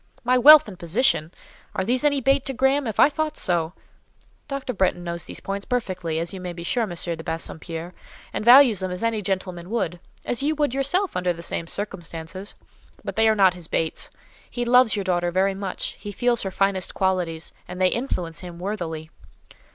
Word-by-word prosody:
"My 250 +1 +3
wealth 300 +4 +9
and 185 - -10
position! 170 -3 +1 0.4
Are 190 - -1
these 250 +5 +1
any 285 -2 +2
bait 270 +1 +3
to 270 - 0
Graham? 265 +1 +2
If 220 - -4
I - - +8
thought 305 +1 -3
so——" 170 -2 0 0.7
"Dr. 275 -3 -4
Bretton 180 -2 0
knows 170 -1 -3
these - - -9
points 200 0 -4
perfectly, 185 -10 -2
as 165 +2 -3
you 190 - -7
may 180 -1 -5
be 170 0 -8
sure, 240 +8 0
M. 220 - -1
de 165 -1 -2
Bassompierre, 165 +1 -5 0.4
and - - -2
values 245 -3 +7
them 185 - -1
as 180 +3 -5
any 230 -2 0
gentleman 185 -2 -3
would—as 220 +3 -3
you 305 +3 +1
would 290 -4 0
yourself, 315 +9 0
under 180 -1 +1
the 170 0 -9
same 165 - -3
circumstances—but 185 -1 -7
they 225 0 +4
are 220 - +3
not 190 -3 +5
his 175 -3 -8
baits. 160 0 -2 0.4
He 240 -1 -3
loves 250 -1 +5
your 200 - -2
daughter 175 -2 0
very 190 +2 +1
much; 190 -1 -3
he 205 - -7
feels 240 +3 +1
her 195 - -2
finest 190 -1 0
qualities, 180 -4 -1
and 180 0 -7
they 185 -1 +4
influence 180 -10 -3
him 175 -2 -9
worthily." 170 -5 -5
190 Hz, 190 wpm, -24 LUFS, 175-245 Hz, 0.7 s, wealth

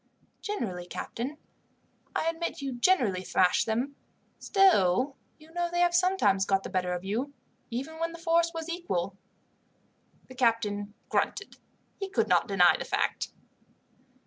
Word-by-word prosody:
"Generally, 190 - -4
captain. 260 +10 -5 0.8
I 320 - 0
admit 330 +1 -2
you 275 -2 -3
generally 240 - +2
thrash 185 -1 +2
them. 245 +6 -1 0.4
Still, 270 - +3 0.2
you 310 +1 -18
know 345 0 -1
they 350 0 0
have 350 0 +4
sometimes 355 - +3
got 195 -1 +2
the - - -7
better 180 -1 0
of 180 0 -4
you, 245 +9 -3 0.3
even 275 +7 -5
when 330 0 -1
the 335 - -9
force 335 0 +2
was 330 -1 -5
equal." 335 - -2 1.1
The - - -11
captain 220 -4 0
grunted. - - -1 0.4
He 390 -1 -3
could 395 - +1
not - - +3
deny - - +5
the - - -2
fact. - - -1
270 Hz, 145 wpm, -29 LUFS, 205-340 Hz, 1.1 s, deny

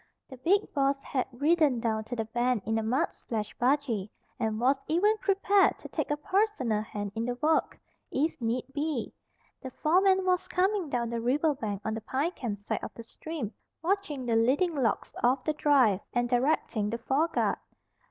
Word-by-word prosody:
The 260 - -8
big 385 +11 +1
boss 275 -1 +2
had 260 -3 -1
ridden 290 0 +2
down 220 -2 -1
to 245 - -5
the 225 -2 -2
bend 240 -1 0
in 220 +1 0
a - - -1
mud 255 +10 0
splashed 215 -3 -5
buggy, 245 -6 +1 0.3
and 220 -1 -1
was 265 +3 +3
even 400 +7 +3
prepared 395 0 +3
to - - -10
take - - -2
a 295 - 0
personal 300 - +1
hand 205 -2 -5
in 225 +1 -2
the 245 0 -2
work, 310 +5 +1 0.3
if 305 +5 0
need 235 +2 -1
be. 290 -4 -2 0.5
The 260 - -6
foreman 375 +7 +3
was 365 0 +1
coming 370 -1 +1
down 235 -3 -1
the 235 -1 -2
river 290 +6 +2
bank 210 -6 -4
on 220 - -1
the 225 - -4
Pine 275 +9 -1
Camp 235 - -4
side 205 - -4
of - - -5
the 230 - -8
stream, 265 -1 -6 0.3
watching 335 -8 -1
the 230 -2 +1
leading 270 +10 +3
logs 255 -7 -1
of 255 +2 +3
the 310 - 0
drive, 270 -10 +4
and 245 0 +1
directing 245 -4 +1
the 230 - -2
foreguard. 295 +8 0
260 Hz, 185 wpm, -29 LUFS, 230-320 Hz, 0.5 s, drive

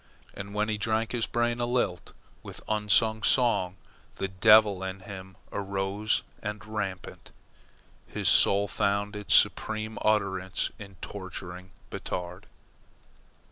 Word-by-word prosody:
And 100 +1 -8
when 105 +1 +1
he 110 - 0
had 105 - -4
drunk, 110 +1 0
his 120 -2 0
brain 120 0 0
a 120 - 0
lilt 120 -8 -1 0.3
with - - -10
unsung 110 +1 +2
song 105 -7 +2
and - - -30
the 95 - -1
devil 105 0 +6
in 95 0 -5
him 95 -1 -9
aroused 100 +2 -1 0.2
and 105 0 -5
rampant, 105 -4 -5 0.8
his - - -3
soul 100 +1 +5
found 100 +1 0
its 105 -1 +2
supreme 110 0 +2
utterance 95 -3 0
in 100 -2 -10
torturing 95 -1 -7 0.2
Batard. 90 +3 -5
100 Hz, 130 wpm, -28 LUFS, 95-110 Hz, 0.8 s, devil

